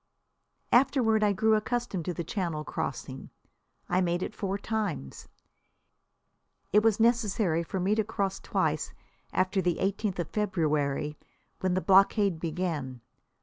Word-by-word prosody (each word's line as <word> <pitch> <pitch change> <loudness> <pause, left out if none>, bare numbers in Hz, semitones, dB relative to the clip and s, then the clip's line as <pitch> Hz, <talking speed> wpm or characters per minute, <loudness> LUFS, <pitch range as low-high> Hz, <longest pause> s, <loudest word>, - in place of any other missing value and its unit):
Afterward 240 -4 +4
I 210 - +4
grew 220 +3 +2
accustomed 215 -5 -1
to 180 - -2
the 170 - -3
Channel 170 -4 -3
crossing. - - -5 0.6
I 185 - +2
made 175 0 0
it - - -5
four 195 -2 -2
times. 205 - -4 1.5
It 210 - +6
was 225 -1 +2
necessary 220 -7 +2
for 180 +3 -4
me 190 +3 +2
to 220 0 +2
cross 200 -2 -2
twice - - -1 0.4
after 185 +1 +1
the 175 -2 0
eighteenth 200 0 -1
of 175 -3 -3
February, 150 -7 0 0.4
when 185 -1 0
the 185 - +1
blockade 195 -2 +4
began. 155 -7 -3
190 Hz, 135 wpm, -28 LUFS, 170-215 Hz, 1.5 s, It